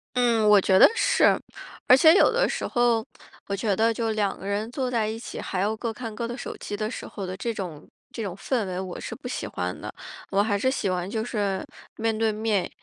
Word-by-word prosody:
嗯， 235 Hz, -3 st, +3 dB
我 205 Hz, -1 st, +8 dB
觉 190 Hz, 0 st, +4 dB
得 -, -, +9 dB
是。 -, -, +4 dB, 0.5 s
而 255 Hz, -, +9 dB
且 315 Hz, +4 st, +7 dB
有 -, -, +5 dB
的 -, -, +2 dB
时 -, -, -3 dB
候， 240 Hz, -2 st, +2 dB, 0.4 s
我 200 Hz, -, -1 dB
觉 200 Hz, 0 st, 0 dB
得 225 Hz, +3 st, +2 dB
就 225 Hz, 0 st, -1 dB
两 205 Hz, -2 st, -1 dB
个 195 Hz, -, -8 dB
人 205 Hz, +2 st, -2 dB
坐 260 Hz, -1 st, -2 dB
在 230 Hz, -3 st, 0 dB
一 220 Hz, +1 st, -4 dB
起， 240 Hz, -, -7 dB
还 185 Hz, -, -3 dB
要 210 Hz, +3 st, +1 dB
各 230 Hz, +1 st, -3 dB
看 225 Hz, -1 st, -6 dB
各 230 Hz, +1 st, -3 dB
的 240 Hz, -, -5 dB
手 -, -, -6 dB
机 205 Hz, -, -5 dB
的 215 Hz, +1 st, -2 dB
时 -, -, -6 dB
候 200 Hz, -, -6 dB
的 185 Hz, 0 st, -5 dB
这 235 Hz, -, -2 dB
种 180 Hz, -8 st, -7 dB, 0.2 s
这 225 Hz, -, -5 dB
种 190 Hz, -3 st, -4 dB
氛 230 Hz, +2 st, -1 dB
围 185 Hz, -1 st, -4 dB
我 185 Hz, -1 st, -5 dB
是 -, -, -6 dB
不 265 Hz, -, -9 dB
喜 250 Hz, -, -4 dB
欢 -, -, -4 dB
的。 -, -, -7 dB, 0.4 s
我 195 Hz, 0 st, +3 dB
还 205 Hz, -1 st, +1 dB
是 260 Hz, +6 st, +1 dB
喜 210 Hz, -7 st, -1 dB
欢 180 Hz, 0 st, -2 dB
就 220 Hz, 0 st, -2 dB
是 200 Hz, -5 st, -2 dB, 0.3 s
面 225 Hz, -1 st, 0 dB
对 220 Hz, 0 st, +2 dB
面， 210 Hz, -3 st, 0 dB
220 Hz, 260 characters per minute, -25 LUFS, 200-235 Hz, 0.5 s, 得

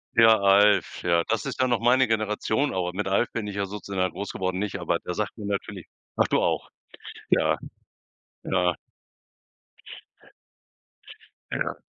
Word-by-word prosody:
Ja, 115 Hz, -1 st, +7 dB
„Alf“. 100 Hz, +1 st, +4 dB
Ja, 85 Hz, -1 st, +2 dB
das 115 Hz, +6 st, -1 dB
ist 135 Hz, -, -5 dB
ja 130 Hz, -, +3 dB
noch 120 Hz, -2 st, +1 dB
meine 125 Hz, +2 st, +4 dB
Generation 110 Hz, +5 st, 0 dB
aber, 90 Hz, -1 st, -2 dB
mit 100 Hz, +1 st, -3 dB
„Alf“ 100 Hz, +5 st, +1 dB
bin 110 Hz, -3 st, -4 dB
ich 100 Hz, -, -6 dB
ja 100 Hz, 0 st, -1 dB
sozusagen 95 Hz, -2 st, -3 dB
groß 100 Hz, 0 st, -5 dB
geworden, 95 Hz, 0 st, -2 dB
nicht? 105 Hz, -1 st, -3 dB
Aber -, -, 0 dB
der 90 Hz, -, -6 dB
sagt 105 Hz, +1 st, -3 dB
mir 105 Hz, -, -7 dB
natürlich 100 Hz, -2 st, -4 dB, 0.3 s
ach -, -, +2 dB
du -, -, +2 dB
auch. -, -, -1 dB, 0.6 s
Ja. -, -, +3 dB, 0.9 s
Ja. 90 Hz, -1 st, +1 dB, 2.8 s
Ja. -, -, -2 dB
100 Hz, 150 wpm, -25 LUFS, 95-110 Hz, 2.8 s, Ja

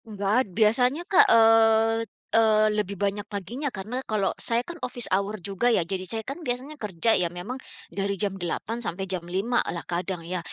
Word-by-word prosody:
Nggak 205 Hz, -3 st, -3 dB
ada, 260 Hz, -, -5 dB
biasanya 240 Hz, -, +2 dB
Kak, 380 Hz, -1 st, +6 dB
eee 225 Hz, 0 st, +5 dB, 0.3 s
eee, 215 Hz, -1 st, +4 dB
lebih 210 Hz, -2 st, -2 dB
banyak 200 Hz, +1 st, -2 dB
paginya 210 Hz, -, -4 dB
karena 215 Hz, +6 st, -4 dB
kalau 210 Hz, -3 st, 0 dB
saya 235 Hz, +1 st, +1 dB
kan 340 Hz, +5 st, -9 dB
office 245 Hz, -1 st, -1 dB
hour 200 Hz, +3 st, 0 dB
juga 200 Hz, +5 st, -1 dB
ya, 225 Hz, -7 st, +3 dB
jadi 185 Hz, +2 st, -4 dB
saya 225 Hz, +2 st, -3 dB
kan 275 Hz, +8 st, -6 dB
biasanya 260 Hz, +5 st, -4 dB
kerja 210 Hz, +1 st, 0 dB
ya 180 Hz, -5 st, +3 dB
memang, 180 Hz, +10 st, -6 dB, 0.3 s
dari 200 Hz, 0 st, -1 dB
jam 195 Hz, -1 st, -1 dB
8 205 Hz, +6 st, -3 dB
sampai 195 Hz, -5 st, -2 dB
jam 190 Hz, -1 st, -2 dB
5 205 Hz, +7 st, 0 dB
lah 170 Hz, -, -4 dB
kadang 175 Hz, 0 st, -3 dB
ya. 180 Hz, +1 st, -2 dB
210 Hz, 190 wpm, -25 LUFS, 190-230 Hz, 0.3 s, Kak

